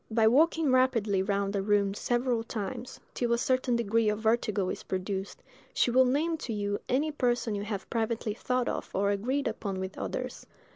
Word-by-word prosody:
By 220 0 +3
walking 310 +4 +4
rapidly 230 -7 +3
round 200 0 -1
a 200 - +1
room 200 -1 +2
several 240 +2 0
times, 230 +3 -5
till 240 -1 0
a - - +3
certain 255 0 +1
degree 225 -1 +2
of 210 - 0
vertigo 220 -3 +1
is - - -4
produced, 190 +1 -4 0.3
she 245 - +3
will 260 +2 +5
name 310 +6 +1
to 250 - -5
you 205 -1 -1
any 290 +5 +1
person 245 -5 0
you 200 - -2
have 205 -3 -4
privately 225 -1 -1
thought 250 +2 -1
of - - -3
or 200 +1 +2
agreed 255 +8 -1
upon 195 -3 -3
with 190 0 -5
others. - - -5
225 Hz, 185 wpm, -29 LUFS, 200-255 Hz, 0.3 s, will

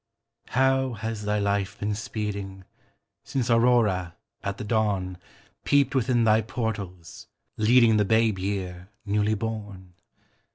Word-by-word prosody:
How 130 0 +2
has 110 -1 -5
thy 105 0 +1
life 100 0 -1
been 105 +1 -1
speeding 100 -3 -5 0.6
Since 125 -3 -1
Aurora, 115 -7 +3 0.3
at 100 0 -4
the - - -5
dawn, 100 -5 -1 0.4
Peeped 140 -2 +3
within 125 -2 +2
thy 110 0 +4
portals, 100 -7 -5 0.3
leading 115 0 +5
The 105 - +3
babe 110 -1 +2
year, 95 -1 -4 0.2
newly 105 +1 +1
born? 105 -4 -6
105 Hz, 120 wpm, -26 LUFS, 100-115 Hz, 0.6 s, leading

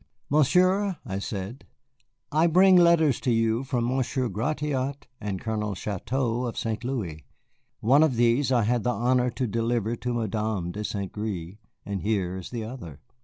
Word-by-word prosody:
"Monsieur," 185 +6 +3
I 95 -4 -3
said, 100 +5 -6 0.6
"I 155 +3 +4
bring 185 +3 +6
letters 170 -6 +5
to 130 - -2
you 115 +1 +1
from 125 -3 -1
Monsieur 130 0 0
Gratiot 140 +4 -2
and 100 -3 -3
Colonel 105 -2 -2
Chouteau 120 +5 -2
of 115 - -6
St. 110 0 -2
Louis. 100 - -4 0.6
One 135 +7 +5
of 155 -5 +3
these 120 +4 +2
I 120 -3 +3
had 120 +2 +1
the 125 - 0
honor 125 +1 +2
to 125 +2 -2
deliver 115 0 -1
to 125 - -3
Madame 110 -5 -2
de 105 +3 -5
St. 100 -2 -3
Gré, 100 -3 -5 0.3
and 100 -2 -3
here 95 -4 -1
is 95 -2 -7
the 120 -2 -4
other." 110 - -8
120 Hz, 165 wpm, -26 LUFS, 105-135 Hz, 0.6 s, bring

